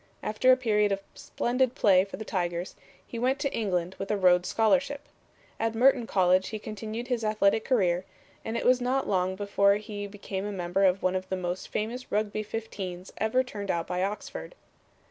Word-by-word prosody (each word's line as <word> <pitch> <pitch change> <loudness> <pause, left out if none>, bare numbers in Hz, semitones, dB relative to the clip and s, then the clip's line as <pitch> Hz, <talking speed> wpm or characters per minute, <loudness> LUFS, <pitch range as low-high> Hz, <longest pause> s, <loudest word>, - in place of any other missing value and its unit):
After 235 +5 +3
a 255 - +6
period 210 -4 +2
of 195 0 -1
splendid 250 +1 -1
play 190 -8 +5
for 195 - -8
the 220 - -7
Tigers 175 -2 -2 0.3
he 235 - -6
went 260 +3 +1
to 280 -1 -2
England 185 -5 -1
with 195 - -4
a 210 - +1
Rhodes 180 -1 +4
Scholarship. 280 +5 +1 0.5
At 225 0 -1
Merton 250 0 +4
College 185 -1 +3
he 220 - -4
continued 215 +3 -6
his 240 -3 -1
athletic 215 0 +2
career, 185 -8 +2 0.4
and 225 +1 -3
it - - -3
was 250 0 +4
not 260 +2 0
long 185 -1 +1
before 200 0 +3
he 205 -1 -5
became 195 -1 -5
a - - -3
member 185 0 0
of 190 +1 +2
one 185 0 +2
of 185 0 -3
the 190 - -1
most 180 0 -4
famous 235 +4 -4
Rugby 215 0 0
fifteens 200 -4 -6
ever 220 +4 +2
turned 205 -6 -7
out 170 -2 0
by 180 0 -2
Oxford. 205 - -4
210 Hz, 190 wpm, -28 LUFS, 185-230 Hz, 0.5 s, a